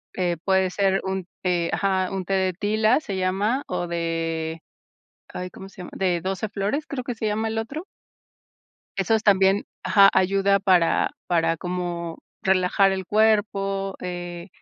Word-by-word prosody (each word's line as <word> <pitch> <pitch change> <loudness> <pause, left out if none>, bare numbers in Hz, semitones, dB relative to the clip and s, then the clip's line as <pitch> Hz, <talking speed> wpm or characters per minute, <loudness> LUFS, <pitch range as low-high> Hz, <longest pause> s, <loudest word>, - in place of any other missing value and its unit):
eh, 175 -2 0
puede 190 -1 +3
ser 195 +1 +1
un 190 -1 -3
té 175 -2 0
Ajá, 190 -2 +1
un 195 -1 -3
té 185 - -7
de 190 -1 +1
tila 215 - +2
se 195 -9 -4
llama 200 +8 0
o - - -2
de 165 -1 -2 0.7
ay, 180 0 -6
¿cómo 190 - -10
se 195 - -21
llama? - - -9
De 180 -3 +1
12 190 +4 -3
flores, 205 +10 -2
creo 270 -3 -4
que 245 -1 -5
se 220 - -2
llama 215 +1 0
el 220 0 -2
otro. 275 +10 -4 1.1
Esos 215 +3 +2
también 195 -1 +4 0.2
Ajá, 200 -1 +7
ayuda 195 +1 +3
para 180 -4 +3 0.2
para 165 -2 +2
como 175 -1 -4 0.2
relajar 190 +1 +3
el 190 0 -3
cuerpo, 200 -2 +1
eh, 175 0 -6
190 Hz, 155 wpm, -24 LUFS, 180-205 Hz, 1.1 s, Ajá